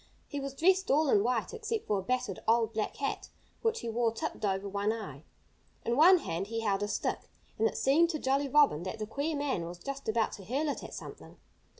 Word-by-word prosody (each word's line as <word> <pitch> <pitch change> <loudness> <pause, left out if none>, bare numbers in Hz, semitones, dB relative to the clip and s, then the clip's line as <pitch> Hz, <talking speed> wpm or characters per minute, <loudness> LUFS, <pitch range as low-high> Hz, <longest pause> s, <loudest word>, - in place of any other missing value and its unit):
He 285 - -4
was 275 0 -5
dressed 375 +5 +3
all 295 +1 +3
in 205 - +5
white, 245 - 0
except 450 -1 -3
for 205 -2 +1
a - - -3
battered, 250 -2 -2
old, 225 0 +3
black 215 -1 -2
hat, 275 - -3 0.3
which 455 0 0
he - - -5
wore 230 0 +1
tipped 225 - -5
over 195 0 0
one 200 +2 0
eye. 195 -11 -7 0.6
In 235 - +1
one 350 +7 +8
hand 180 - -3
he 225 +1 -3
held 200 -3 0
a 205 - 0
stick. - - -2 0.3
And 225 - +4
it - - -4
seemed 320 +6 +4
to 320 - -1
Jolly 275 0 +1
Robin 285 - +4
that 190 +5 -5
the 215 - -3
queer 285 +8 -2
man 285 -11 -1
was 175 +1 -7
just 275 +5 -5
about 220 0 +1
to 200 - -9
hurl 275 +10 -1
it - - -3
at - - -8
something. - - -10
235 Hz, 230 wpm, -31 LUFS, 210-290 Hz, 0.6 s, one